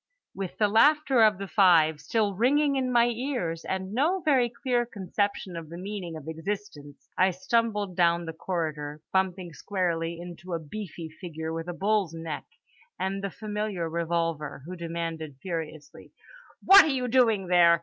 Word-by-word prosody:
With 195 -2 -6
the 210 - +3
laughter 270 +4 +4
of 215 -3 +5
the 195 0 -6
Five 165 -7 +4
still 215 -3 0
ringing 280 +7 +2
in 260 -1 0
my 235 -1 +5
ears, 230 - -3
and 190 +1 -4
no 315 +10 +2
very 260 -5 +3
clear 240 0 0
conception 200 -3 -3
of 165 -2 -7
the 170 - -8
meaning 185 -3 -5
of 155 -1 -11
existence, 160 -3 -6
I 185 - +5
stumbled 205 +1 0
down 170 -1 +2
the 160 - -5
corridor; 155 -3 -4
bumping 185 -2 0
squarely 170 -3 -2
into 175 0 -8
a - - -2
beefy 170 +1 -7
figure 160 -1 -6
with 165 +1 -5
a 175 - -3
bull's 195 -2 0
neck 165 -2 -5 0.5
and 195 +1 -2
the 200 - -1
familiar 210 -4 -3
revolver 165 -4 -2
who 180 +2 -7
demanded 165 -4 -5
furiously: 160 -3 -6 0.6
"What 390 +1 +10
are - - 0
you 260 -4 0
doing 230 -5 +3
there? 170 -2 +5
185 Hz, 160 wpm, -27 LUFS, 165-215 Hz, 0.6 s, What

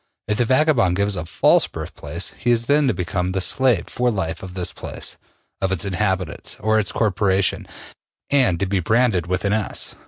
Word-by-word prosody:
If 105 +1 -1
the 120 - +3
vagabond 130 - +3
gives 100 +1 0
a 90 -2 -5
false - - +3
birthplace, - - -6
he 120 - -2
is 120 -1 +3
then 145 +2 +3
to 125 - +2
become 90 +1 -2
the 95 - 0
slave 120 -1 +2
for 125 0 0
life 85 -7 -2
of 95 -1 -9
this 90 -2 -2
place, - - -5 0.4
of 95 -1 0
its 95 - -1
inhabitants, 95 -2 -2
or 110 0 +2
its 100 - 0
corporation, 95 -3 +1 0.6
and 130 -12 +3
to 100 - +1
be 95 0 0
branded 110 -2 +2
with 90 +2 -1
an 100 - +2
S. 110 -2 -2
100 Hz, 190 wpm, -21 LUFS, 90-115 Hz, 0.6 s, the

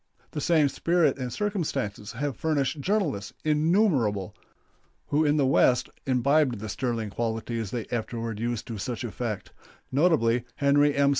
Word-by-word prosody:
The 150 - -4
same 155 -3 +4
spirit 165 +2 +1
and 125 -1 -3
circumstances 140 - -2
have 140 +2 -2
furnished 150 0 0
journalists 150 - -1
innumerable, 150 - +2 0.7
who 150 +2 +3
in 150 0 +3
the 140 - +3
West 130 -1 +3 0.2
imbibed 135 0 +3
the 110 +1 -6
sterling 115 -1 -2
qualities 115 -1 -2
they 120 0 -3
afterward 115 -1 -3
used 120 0 -2
to 115 -3 -6
such 125 +2 -4
effect 115 -2 -4 0.4
notably, 130 -6 +3
Henry 145 +1 +3
M. 140 0 +4
130 Hz, 140 wpm, -27 LUFS, 115-150 Hz, 0.7 s, same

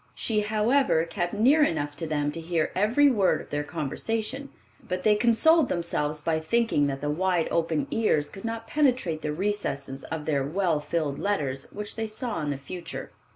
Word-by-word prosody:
She, 220 -2 0
however, 215 - +2
kept 175 0 -2
near 265 +9 +4
enough 145 - +1
to 165 - -3
them 145 -1 0
to 165 - -6
hear 165 -1 -1
every 240 +9 +4
word 200 -6 +2
of - - -12
their 145 0 -1
conversation; 225 - -3 0.3
but 185 -7 -4
they 215 - +5
consoled 245 +7 +4
themselves 155 -3 -1
by 160 +1 0
thinking 190 -3 +1
that 135 -1 -3
the 145 - -1
wide 180 +1 +1
open 165 -2 0
ears 155 -10 +1
could 195 - -10
not 230 0 -4
penetrate 250 - +1
the 150 - -2
recesses 150 -7 -2
of 160 -1 -5
their 140 -3 +1
well 165 +2 0
filled 150 -1 -2
letters 140 -10 -1
which 210 +1 -6
they 225 0 -1
saw 220 -2 -3
in 150 - -2
the 140 - -2
future. 170 +6 -7
175 Hz, 185 wpm, -26 LUFS, 150-225 Hz, 0.3 s, they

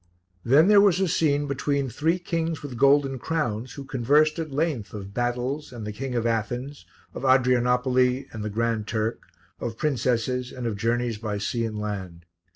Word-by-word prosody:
Then 140 +8 +5
there 205 -1 +7
was 195 -3 +4
a 190 - +2
scene 145 -4 +1
between 140 0 -1
three 155 +8 0
kings 165 -3 -3
with 140 -4 -6
golden 135 +1 +3
crowns 125 -6 -2
who 140 - -7
conversed 145 +5 +2
at 160 -1 -3
length 135 - -2
of 100 -1 -8
battles 125 +5 -2
and 120 -4 -7
the 105 - -4
King 130 +4 -5
of 120 -1 0
Athens, 120 +5 -2 0.3
of - - -6
Adrianopoli 125 0 +3
and 110 -2 -5
the 105 - -2
Grand 115 0 -1
Turk, 110 +1 -1 0.4
of 115 -1 -4
princesses 125 -2 0
and 125 -2 -6
of 115 -3 -1
journeys 115 +1 -1
by 105 -2 -3
sea 115 +3 -1
and 110 -1 -4
land. 95 -5 -5
125 Hz, 175 wpm, -25 LUFS, 115-145 Hz, 0.4 s, there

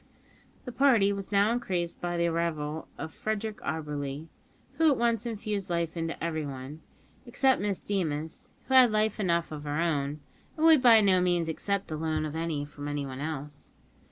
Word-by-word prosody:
The 250 - -5
party 235 -6 +4
was 195 0 -6
now 200 +2 +4
increased 185 -8 -2
by 175 0 -2
the 170 - +2
arrival 160 -2 -2
of 160 +2 -6
Frederick 215 0 -3
Auberly, 150 0 -4 0.5
who 325 -1 +5
at 280 - +2
once 235 -1 +1
infused 210 -3 -4
life 170 -1 -1
into 165 0 -3
everybody, 150 -3 -4 0.5
except 260 +2 +2
Miss 200 -2 -1
Deemas, 160 -6 -3 0.2
who 265 - -2
had 255 -3 +7
life 215 0 +1
enough 170 -5 0
of 150 -1 -6
her 145 +1 -2
own, 150 -3 -1 0.4
and 315 - +2
would 320 -4 +7
by 230 -3 +7
no 190 -3 +4
means 175 -2 +1
accept 200 +5 -2
the 155 - -4
loan 155 0 -1
of 155 0 -5
any 160 -3 -2
from 145 0 -8
anyone 140 -3 -4
else. 150 -1 -6
170 Hz, 175 wpm, -28 LUFS, 155-215 Hz, 0.5 s, had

